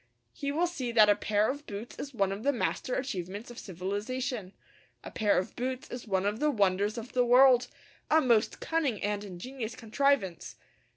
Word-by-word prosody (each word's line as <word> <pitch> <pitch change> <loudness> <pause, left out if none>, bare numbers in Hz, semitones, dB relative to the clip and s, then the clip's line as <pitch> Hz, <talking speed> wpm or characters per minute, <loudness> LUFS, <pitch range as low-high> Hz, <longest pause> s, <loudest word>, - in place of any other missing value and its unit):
He 280 0 -3
will 325 +5 +1
see 275 -9 -3
that 215 -2 +7
a - - +4
pair 210 +1 +1
of 285 +3 -4
boots 210 +3 -7
is 280 - -5
one 195 -6 0
of 195 +2 -4
the 280 - +2
master 250 0 -2
achievements 205 -3 -4
of 240 - -9
civilization. 205 - -4 0.5
A - - -8
pair 210 -2 +2
of 185 - -2
boots 255 +1 -4
is 245 -1 -7
one 190 -1 0
of 210 +2 -1
the 300 - +2
wonders 205 -2 +1
of 230 +1 -7
the 250 - +3
world, 250 0 +6 0.4
a 315 - +6
most 235 -6 +2
cunning 295 -10 0
and 205 0 -1
ingenious 220 +5 -6
contrivance. 225 - 0
230 Hz, 185 wpm, -30 LUFS, 205-260 Hz, 0.5 s, that